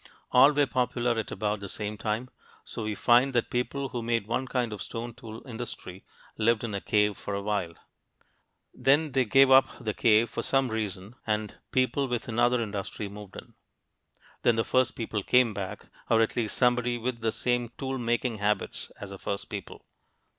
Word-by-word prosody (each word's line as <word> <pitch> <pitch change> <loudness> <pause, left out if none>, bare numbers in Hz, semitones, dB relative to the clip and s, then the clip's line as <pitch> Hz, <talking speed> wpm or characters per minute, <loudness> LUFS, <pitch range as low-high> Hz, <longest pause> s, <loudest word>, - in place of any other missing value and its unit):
All 130 +3 +7
were 145 -1 +3
popular 125 -2 0
at 110 - -4
about 105 +1 -2
the 100 -1 -6
same 105 +2 -4
time. 110 +4 -3 0.3
So - - -6
we 105 -1 -2
find 125 +6 +4
that 120 - +1
people 135 +3 -1
who 120 - -4
made 115 -2 0
one 120 +4 -2
kind 120 -4 -1
of 105 - -7
stone 120 +1 -5
tool 115 -2 -10
industry 110 -6 -7 0.4
lived 115 +1 +2
in 115 -3 -3
a 100 - -2
cave 105 -1 +2
for 100 - -4
a 100 - -2
while. 100 -5 -1 1.0
Then 145 +3 +3
they 130 -1 +2
gave 135 +4 +5
up 130 0 +8
the 105 - -2
cave 110 +1 +4
for 110 - -4
some 135 -3 +1
reason, 105 +1 -4
and 105 -1 -1 0.2
people 130 +2 +1
with 120 -2 -3
another 120 +2 +2
industry 100 -1 -4
moved 100 -1 -11
in. - - -10 0.9
Then 120 - +4
the 115 - +2
first 130 +2 +1
people 110 -2 -3
came 125 +2 +4
back 100 0 -5 0.2
or 115 - +4
at 115 - +2
least 115 -3 -1
somebody 125 -1 +2
with 120 0 -3
the 115 0 +1
same 120 0 0
tool 135 -1 -3
making 120 0 0
habits 105 -1 -1
as 100 -1 -7
the 100 - -8
first 100 0 -4
people. 100 -3 -7
115 Hz, 190 wpm, -28 LUFS, 105-125 Hz, 1.0 s, up